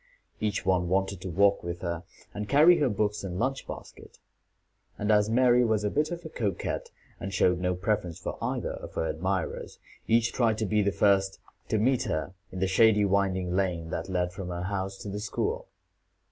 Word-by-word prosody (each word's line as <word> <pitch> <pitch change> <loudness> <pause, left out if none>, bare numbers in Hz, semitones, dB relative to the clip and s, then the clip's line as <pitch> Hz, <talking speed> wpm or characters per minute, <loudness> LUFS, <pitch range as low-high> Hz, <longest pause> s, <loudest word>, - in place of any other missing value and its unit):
Each 105 -3 -1
one 90 -1 +2
wanted 95 0 0
to 95 - -5
walk 100 +3 +3
with 85 0 -5
her, 85 -2 -3 0.3
and 105 0 -5
carry 160 +5 +6
her 145 -4 +3
books 105 0 -1
and 90 -2 -4
lunch 130 +5 -1
basket; - - -10 0.8
and 105 +1 0
as 105 0 +4
Mary 125 +1 +4
was 110 -3 +1
a 105 - 0
bit 150 +1 +1
of 175 -1 -6
a - - -5
coquette, 105 - -3 0.3
and 95 - -5
showed 90 -2 +2
no 90 0 0
preference 90 -3 -1
for - - -5
either - - -2
of - - -8
her - - 0
admirers, 95 +2 -2 0.3
each 115 +1 +3
tried 115 -3 +2
to 110 - -1
be 105 +1 +2
the 100 0 +2
first 95 -1 +2 0.3
to 110 - +2
meet 125 +4 +2
her 80 +4 -2 0.2
in - - -7
the - - +3
shady 105 +2 +5
winding 95 -2 +1
lane 85 -4 -1
that 85 +3 -4
led 90 -1 -1
from 95 -1 -6
her 90 0 -4
house 95 0 -3
to - - -7
the 100 +1 -4
school. 450 - -2
100 Hz, 200 wpm, -28 LUFS, 90-110 Hz, 0.8 s, carry